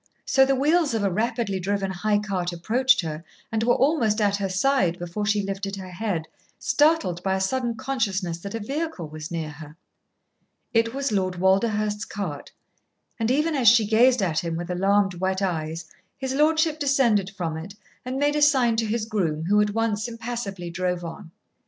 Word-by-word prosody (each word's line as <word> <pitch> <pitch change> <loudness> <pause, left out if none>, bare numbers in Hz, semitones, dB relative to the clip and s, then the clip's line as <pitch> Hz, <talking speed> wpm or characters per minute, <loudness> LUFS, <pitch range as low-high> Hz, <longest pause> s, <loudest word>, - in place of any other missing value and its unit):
So 265 0 +4
the 270 - +3
wheels 295 0 +2
of 220 - 0
a 200 - +1
rapidly 220 -1 -1
driven 195 +1 -1
high 205 +3 +1
cart 190 -4 -2
approached 245 +9 +2
her 160 -1 -5 0.3
and 220 0 0
were 240 +2 +3
almost 245 -7 +2
at 200 -1 +2
her 195 -1 -2
side 190 -3 +1
before 175 +4 -4
she 205 -1 +2
lifted 195 0 -4
her 190 -2 -8
head, 180 -4 -3 0.3
startled 295 - +2
by 190 0 0
a - - -1
sudden 240 +4 -1
consciousness 210 -10 -2
that 200 +4 -6
a - - -2
vehicle 275 - -4
was 155 0 -8
near 160 -3 -4
her. 150 +1 -12 1.0
It 230 +1 +2
was 275 -2 -1
Lord 185 -3 0
Walderhurst's 210 +3 +1
cart, 175 -9 -6 0.7
and 225 0 0
even 300 +5 +2
as 260 -5 +1
she 225 0 +7
gazed 235 +2 +4
at 160 -4 +1
him 170 -1 -3
with 175 +2 -4
alarmed 195 +2 +2
wet 190 +1 -1
eyes, 165 -2 -2 0.3
his 265 -1 -3
lordship 315 +2 +2
descended 250 -9 +2
from 165 -3 -2
it 175 +5 -8 0.3
and 255 +1 -4
made 290 +1 +1
a 300 - +1
sign 260 -6 +4
to 225 -1 0
his 220 0 -1
groom, 170 -8 -1
who 205 +3 +4
at 210 0 0
once 225 -1 0
impassively 230 -6 -5
drove 180 0 -2
on. 165 0 -8
205 Hz, 185 wpm, -24 LUFS, 180-245 Hz, 1.0 s, she